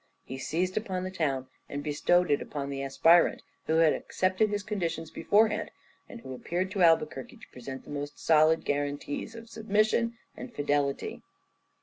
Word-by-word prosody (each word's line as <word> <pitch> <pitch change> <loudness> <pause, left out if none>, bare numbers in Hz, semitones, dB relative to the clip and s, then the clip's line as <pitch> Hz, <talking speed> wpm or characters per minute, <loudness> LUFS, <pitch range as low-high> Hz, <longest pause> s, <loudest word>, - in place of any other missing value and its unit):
He 130 - -7
seized 180 +7 -1
upon 190 -4 -2
the 185 - -4
town 140 -8 -1 0.2
and 145 0 -4
bestowed 175 +3 +2
it 145 - +2
upon 140 -1 -5
the 135 0 -4
aspirant 165 +5 +4 0.2
who 160 - +1
had 165 -1 +5
accepted 185 +3 0
his 205 0 -2
conditions 170 -6 -3
beforehand, 215 +1 +2 0.4
and 235 - -10
who 130 - -8
appeared 180 +8 -3
to 190 - -2
Albuquerque 155 -6 +2
to - - -14
present 130 +1 -8
the - - -12
most 145 0 -5
solid 160 0 +4
guarantees 145 +8 -3
of 230 0 -10
submission 220 +1 +1 0.2
and 255 - -8
fidelity. 145 -1 -1
165 Hz, 160 wpm, -29 LUFS, 145-195 Hz, 0.4 s, had